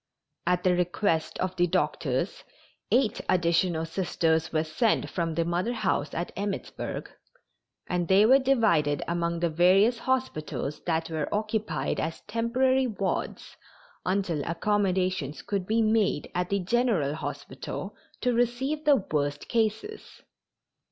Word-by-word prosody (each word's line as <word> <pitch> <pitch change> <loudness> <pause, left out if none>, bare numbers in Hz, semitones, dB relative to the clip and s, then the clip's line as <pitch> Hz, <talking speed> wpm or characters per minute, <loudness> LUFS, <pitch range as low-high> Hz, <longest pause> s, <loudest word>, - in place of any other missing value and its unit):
At 180 0 +2
the 185 - +4
request 180 -1 0
of 185 0 -2
the 175 0 +3
doctors - - -1 0.5
eight 245 -4 +2
additional 170 -1 +2
Sisters 165 -1 0
were 155 -1 +1
sent 190 +9 0
from 165 -3 -2
the 165 0 +1
Mother 175 +7 0
House 155 -9 -1
at 170 +2 -3
Emmittsburg, 200 +1 -4 0.8
and 175 -1 -1
they 195 +4 +6
were 260 +4 +7
divided 215 - +2
among 170 0 -1
the 170 - +2
various 195 +8 +4
hospitals 155 - -2
that 165 -1 0
were 155 -2 -2
occupied 215 +1 -1
as 160 +1 -3
temporary 255 +4 +1
wards 195 -4 -3 0.5
until 185 -5 0
accommodations 185 -4 0
could 195 -3 -2
be 225 +1 +2
made 215 -8 +1
at 180 0 -1
the 200 -1 0
general 190 - +1
hospital 155 - -6 0.3
to 250 - +2
receive 250 +6 0
the 295 -1 +6 0.2
worst 145 -1 -1
cases. 225 - -2
185 Hz, 130 wpm, -27 LUFS, 165-225 Hz, 0.8 s, were